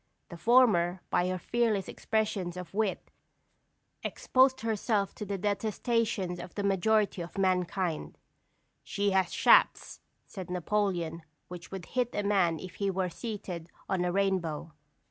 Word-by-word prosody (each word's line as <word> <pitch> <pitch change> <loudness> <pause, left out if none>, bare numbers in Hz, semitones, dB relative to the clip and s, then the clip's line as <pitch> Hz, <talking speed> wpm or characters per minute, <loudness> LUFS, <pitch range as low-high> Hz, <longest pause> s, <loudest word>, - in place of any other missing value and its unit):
The 170 - -8
former, 190 -4 +4
by 180 - +2
her 185 0 -1
fearless 220 -1 0
expressions 205 -5 -2
of 180 -1 -8
wit, 210 -2 -1 0.9
exposed 260 0 +2
herself 215 -2 0
to 210 - -7
the 200 0 -2
detestation 205 -2 -1
of 175 - -10
the 205 - -2
majority 200 0 +2
of 170 +3 -8
mankind. 185 -3 0 0.7
"She 200 0 0
has 190 -1 +2
shafts," - - +4 0.3
said 190 -4 -8
Napoleon, 180 -3 -1 0.3
"which 175 -1 -9
would 190 -3 -7
hit 250 +3 -1
a 205 - 0
man 190 -5 +2
if 185 0 -9
he 200 -1 0
were 185 -1 -1
seated 180 -5 -6 0.2
on 190 -2 0
a 180 - 0
rainbow." 175 -5 -1
195 Hz, 140 wpm, -30 LUFS, 175-210 Hz, 0.9 s, former